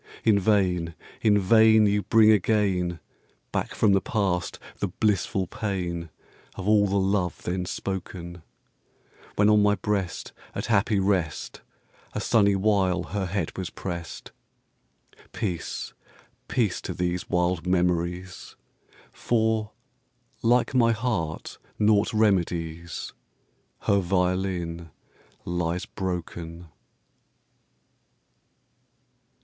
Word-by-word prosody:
In 105 -2 +4
vain, 90 -5 +1 0.3
in 105 -2 +4
vain, 110 +2 +5
you 105 0 +2
bring 110 +1 +5
again 95 -4 +1 0.5
Back - - -2
from 105 -2 +4
the 95 - +3
past 95 -6 -1 0.2
the 100 - 0
blissful 95 0 0
pain 90 -4 -3 0.5
Of 95 - -6
all 105 -1 +5
the 100 +1 0
love 95 -2 0
then 90 +1 -2
spoken; 90 -2 -5 0.9
When 105 - +4
on 105 0 +5
my 105 0 +4
breast, 100 -4 -3 0.2
at - - -3
happy 110 -1 +2
rest, 95 -5 -1 0.5
A - - -2
sunny 100 -4 +3
while 95 -3 +2
her 100 -1 -3
head 90 -2 -3
was 95 -2 -4
pressed 85 -3 -6 1.0
Peace, 90 -6 -4 0.5
peace 110 -7 0
to - - -5
these 90 0 -2
wild 90 0 0
memories! 90 0 -1 0.6
For, 110 -2 0 0.7
like 120 +3 +3
my 115 -3 +4
heart 110 -10 -3 0.2
naught 105 -1 +3
remedies, 85 -6 0 0.7
Her 100 - +3
violin 90 -2 -1 0.6
lies 85 0 -2
broken. 85 -2 -5
95 Hz, 100 wpm, -26 LUFS, 90-105 Hz, 1.0 s, vain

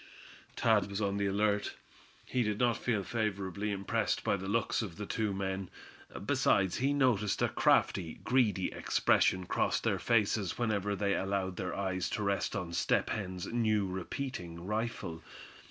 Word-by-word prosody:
Thad 105 -4 +3
was 100 0 -3
on 100 -1 0
the 100 0 +1
alert. 100 +1 +1 0.5
He 125 - 0
did 105 -3 0
not 120 -1 +3
feel 110 -5 -1
favorably 100 -1 -2
impressed 100 -1 -1
by - - +2
the 95 0 -5
looks 115 +3 +1
of 100 -7 -5
the 105 - -4
two 110 0 -1
men. 95 -1 -3 0.6
Besides, 95 -2 +2
he 135 +3 +1
noticed 115 -8 +2
a - - +3
crafty, 85 -5 +2
greedy 115 -7 +2
expression 95 0 +2
cross - - +1
their - - 0
faces 105 -4 +1
whenever 105 -4 0
they 100 0 +1
allowed 95 -1 -1
their 90 - -3
eyes 95 -3 -1
to 105 - -2
rest 100 +2 0
on 90 -4 -3
Step - - +1
Hen's 95 -4 -3
new 110 -4 +2
repeating 90 -2 -5
rifle. 105 -6 -3
100 Hz, 155 wpm, -32 LUFS, 95-110 Hz, 0.6 s, Thad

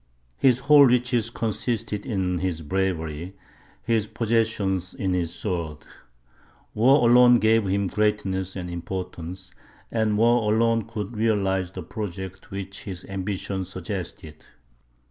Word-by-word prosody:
His 125 -2 +4
whole 145 +1 +7
riches 125 -2 +1
consisted 115 -1 -3
in 95 -5 -1
his 85 -3 -2
bravery, 85 0 -2 0.5
his 110 -2 +1
possessions 110 -5 0
in 95 -2 -1
his 85 -2 -1
sword. 85 -5 -3 1.0
War 125 +3 +5
alone 120 0 +7
gave 110 -2 +3
him 100 +1 +1
greatness 95 -2 -1
and 90 -2 -5
importance, 90 +1 -6 0.4
and 110 -2 +1
war 115 -1 +3
alone 115 0 +2
could 115 -1 -6
realize 95 -4 0
the 95 - -6
projects 95 0 -6
which 100 0 -7
his 90 -3 -7
ambition 95 0 -3
suggested. 90 -4 -7
100 Hz, 120 wpm, -25 LUFS, 90-115 Hz, 1.0 s, whole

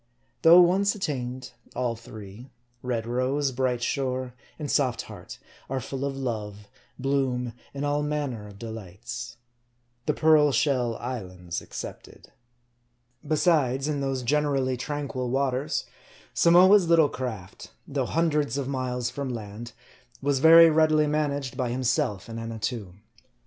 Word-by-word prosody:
Though 170 +2 +9
once 195 +4 +3
attained, 130 -9 -4 0.2
all 120 -2 -1
three 110 +1 -11 0.3
red 120 -3 -2
rose, 130 +4 0
bright 125 -1 -1
shore, 130 -1 -2 0.2
and 150 -2 -4
soft 130 -5 +1
heart - - -10 0.3
are 135 0 -1
full 130 +2 -5
of 135 -1 -3
love, 105 -5 -4 0.3
bloom, 130 -3 -1 0.2
and 140 +1 -4
all 145 0 +1
manner 145 -8 -3
of 100 -1 -13
de 115 +2 -7
lights. 115 +4 -8 0.7
The 150 - +1
Pearl 155 -2 +5
SheU 125 -5 +1
islands 95 -8 -5
excepted. - - -9 0.9
Besides, 145 -4 +2
in 145 -2 -1
those 135 -2 -2
generally 135 -1 +1
tranquil 130 -1 -4
waters, 135 +1 0 0.5
Samoa's 180 +2 +6
little 165 -3 +6
craft, 120 -10 -6 0.2
though - - -2
hundreds 150 -4 +1
of 140 -2 -2
miles 125 -2 -2
from 140 +1 -4
land, 115 0 -7 0.5
was 140 -1 0
very 165 +2 +8
readily 155 -1 +4
managed 145 -3 -1
by 125 -3 -1
himself 125 - -1
and 115 0 -6
Annatoo. 110 -4 -4
130 Hz, 130 wpm, -26 LUFS, 120-145 Hz, 0.9 s, Though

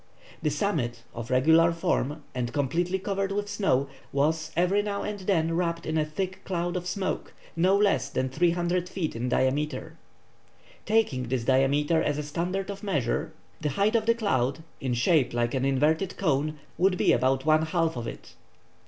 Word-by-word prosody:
The 155 - +1
summit, 140 - -1
of 120 0 -6
regular 160 +6 +5
form, 160 -4 -1
and 120 -2 -2
completely 165 +6 0
covered 195 0 -2
with 205 +1 -2
snow, 165 -10 +1 0.2
was 155 +3 +1
every 180 +4 +3
now 205 -1 -3
and 210 -1 -4
then 165 -4 +1
wrapped 170 -1 -1
in 160 - -2
a 155 - +3
thick 185 +5 -4
cloud 175 -1 -2
of 180 0 -3
smoke, 190 0 -3 0.2
no 185 +4 +4
less 205 -1 +2
than 130 - -1
300 175 +4 0
feet 175 -8 -3
in 120 +2 -2
diameter. 140 +4 -1 0.9
Taking 205 - +1
this 125 -1 -1
diameter 140 +5 +3
as 145 - 0
a 150 - -2
standard 180 +6 -2
of 200 0 -8
measure, 150 - -1 0.3
the 150 - 0
height 200 - +1
of 220 -1 +1
the 230 - +4
cloud, 140 - 0 0.2
in 130 -2 -1
shape 125 +1 +2
like 120 0 0
an 130 0 0
inverted 150 +7 +1
cone, 155 +1 0 0.2
would 185 0 +3
be - - +3
about 130 +2 +1
one 155 0 +4
half 165 -1 0
of 120 -2 -4
it. - - -9
160 Hz, 175 wpm, -27 LUFS, 135-185 Hz, 0.9 s, regular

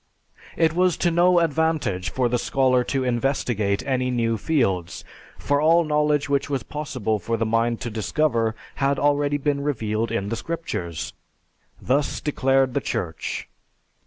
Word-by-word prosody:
It 160 -1 +3
was 180 0 +2
to 175 - +1
no 175 +2 +4
advantage 155 - 0
for 125 +6 0
the 120 0 0
scholar 130 0 +2
to 135 +1 -1
investigate 120 -5 0
any 130 -2 0
new 115 -2 0
fields, 100 - -1 0.3
for 145 0 0
all 165 +2 +5
knowledge 150 -1 +1
which 140 0 0
was 135 -3 -1
possible 125 -8 -3
for 115 +3 -2
the 115 - 0
mind 115 +1 0
to 120 -2 -4
discover 115 0 0 0.2
had 140 0 +1
already 145 0 +2
been 145 0 -1
revealed 115 -5 -1
in 100 -3 -2
the 115 - -1
Scriptures. 105 - -4 0.7
Thus 140 +3 0
declared 135 -3 +1
the 140 - 0
Church. 80 -9 -4
135 Hz, 150 wpm, -23 LUFS, 115-150 Hz, 0.7 s, all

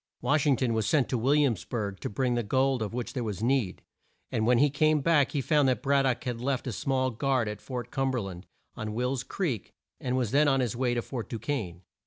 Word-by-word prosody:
Wash 150 0 +1
ing 140 - +5
ton 125 -2 0
was 110 -1 0
sent 150 -5 +3
to 125 - 0
Will 135 +6 +3
iams 130 -11 +2
burg 100 -5 -4
to - - -4
bring 125 +4 0
the 120 - +1
gold 130 +3 +1
of 105 - -2
which 120 0 -4
there 125 -4 -2
was 105 -2 -4
need, 125 -6 0 0.5
and 110 0 0
when 125 0 +5
he 145 +3 +4
came 155 +1 +3
back 145 -2 +3
he 145 - 0
found 145 0 +3
that 125 0 -1
Brad 140 -1 +3
dock 130 -2 0
had 120 -2 -3
left 135 +1 -1
a 130 - -2
small 130 +3 0
guard 130 0 0
at 105 -1 -5
Fort 125 -2 -6
Cum 135 0 0
ber 130 -2 0
land, 95 -2 -8 0.3
on 110 0 -5
Will's 125 +2 0
Creek, 135 - -3 0.3
and 130 0 -1
was 120 -5 0
then 145 +2 +4
on 135 -1 +3
his 120 -4 -1
way 120 0 0
to 120 - -1
Fort 120 -4 -6
Du 115 - -3
quesne. 105 - -3
125 Hz, 255 wpm, -28 LUFS, 115-135 Hz, 0.5 s, ing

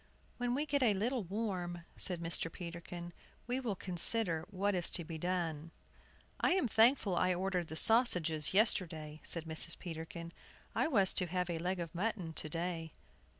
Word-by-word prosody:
"When 245 0 0
we 290 +3 0
get 285 -2 +1
a 225 -5 +4
little 235 +4 0
warm," 180 -3 -3
said 180 -3 -2
Mr. 165 0 0
Peterkin, 175 0 -7 0.3
"we 245 +2 -1
will 235 -6 -2
consider 180 -1 0
what 200 +1 0
is 175 -2 +3
to 175 - +3
be 160 0 -6
done." 165 -3 -2 0.7
"I - - +3
am 365 -9 +2
thankful 225 -3 +4
I 185 +1 +2
ordered 180 -2 -1
the 160 - -7
sausages 170 - +4
yesterday," 160 -7 +1
said 165 -1 0
Mrs. 160 +1 -1
Peterkin. 170 0 -7 0.4
"I - - +2
was 200 -11 +3
to 180 - +2
have 180 +1 -1
had 170 - -1
a - - -6
leg 185 +1 -1
of 170 -1 -5
mutton 180 -3 -2
to 155 - -3
day." 165 -1 -3
180 Hz, 175 wpm, -35 LUFS, 165-210 Hz, 0.7 s, a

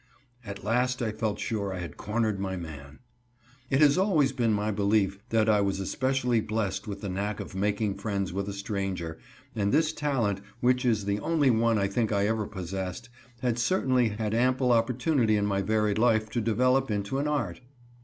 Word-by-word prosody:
At 100 -4 -8
last 125 +3 +1
I 110 - 0
felt 110 -1 -2
sure 100 -3 -2
I 95 - -4
had 85 -4 -6
cornered 110 -1 -1
my 95 -1 -3
man. 75 -4 -9 0.7
It 135 +2 +2
has 150 +3 +5
always 160 -9 +3
been 120 -4 +1
my 105 0 0
belief 100 -1 +1
that 110 -2 +2
I 105 -2 +4
was 100 -1 0
especially 125 +3 0
blessed 110 -2 -2
with 100 -1 -5
the 100 - -4
knack 100 +3 -3
of - - -7
making 100 +1 -1
friends 100 -3 -2
with 100 +1 -2
a - - -4
stranger, 95 -5 -4 0.4
and 100 -2 0
this 155 +1 +2
talent, 120 -11 -1 0.2
which 125 +1 +2
is 110 -4 +1
the 100 +1 0
only 145 +1 +2
one 115 0 +2
I 100 - +1
think 110 +2 -1
I 100 -1 +2
ever 110 -1 0
possessed, 95 +3 -5 0.3
had 120 -1 0
certainly 130 -5 +2
had 105 0 -3
ample 125 +2 +2
opportunity 120 0 +2
in 100 - +1
my 100 -1 0
varied 105 +1 +1
life 110 -2 +2
to 120 - -1
develop 125 +4 +2
into 105 +5 -1
an 145 - 0
art. 150 -3 -2
110 Hz, 190 wpm, -28 LUFS, 100-125 Hz, 0.7 s, has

